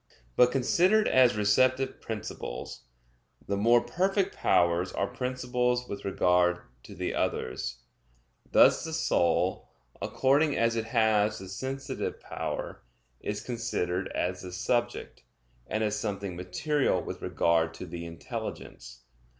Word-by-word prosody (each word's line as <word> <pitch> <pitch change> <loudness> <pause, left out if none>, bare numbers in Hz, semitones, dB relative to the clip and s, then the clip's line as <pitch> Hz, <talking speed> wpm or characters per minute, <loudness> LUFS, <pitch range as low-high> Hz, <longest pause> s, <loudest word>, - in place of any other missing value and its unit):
But 125 0 +5
considered 180 - +3
as 125 -4 +5
receptive 130 +6 +2
principles, 110 - -6 0.6
the 100 - 0
more 115 +4 +4
perfect 195 - 0
powers 85 +1 +2
are - - -1
principles 125 +1 -1
with 100 0 -6
regard 90 -2 +3 0.3
to - - -11
the - - -3
others; - - -2 0.7
thus - - +6
the 160 - -5
soul, 90 - +1 0.3
according 140 +3 +2
as 115 0 +2
it 115 -1 -1
has 110 -2 +2
the 95 - -9
sensitive 130 +8 -4
power, - - -5 0.4
is 105 +1 -4
considered 100 -7 -2
as 90 0 -1
the 90 - -8
subject, 120 +6 -2 0.5
and 110 +1 -1
as 105 0 0
something 100 -3 -3
material 110 - 0
with - - -7
regard 80 -1 +1
to - - -7
the 85 -1 -7
intelligence. 80 -6 -7
110 Hz, 125 wpm, -29 LUFS, 90-125 Hz, 0.7 s, thus